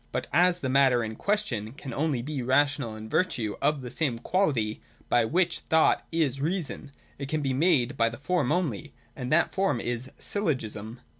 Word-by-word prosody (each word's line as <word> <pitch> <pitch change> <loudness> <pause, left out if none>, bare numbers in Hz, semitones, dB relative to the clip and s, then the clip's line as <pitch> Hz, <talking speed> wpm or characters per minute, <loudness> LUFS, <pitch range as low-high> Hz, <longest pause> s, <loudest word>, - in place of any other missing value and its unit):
But - - -2
as 180 +3 +4
the 130 - -1
matter 130 -3 +4
in 110 0 -5
question 130 - -2
can 135 -3 -8
only 140 -4 0
be 145 -1 -3
rational 130 -2 +1
in 110 0 -8
virtue 125 - 0
of 145 -1 +1
the 125 - -6
same 140 -7 -1
quality 120 - 0 0.3
by - - +4
which 170 +6 +1
thought 160 0 +2
is 145 -5 0
reason, 165 -3 -3 0.3
it 140 -1 -5
can 155 0 -1
be 135 -1 0
made 140 -4 +3
so - - -12
by 115 0 +3
the 115 - -8
form 180 +5 0
only: 150 - -2 0.2
and 125 -1 -5
that 165 +2 +3
form 195 -10 +1
is 120 +2 -3
Syllogism. 120 - -2
140 Hz, 190 wpm, -27 LUFS, 120-160 Hz, 0.3 s, as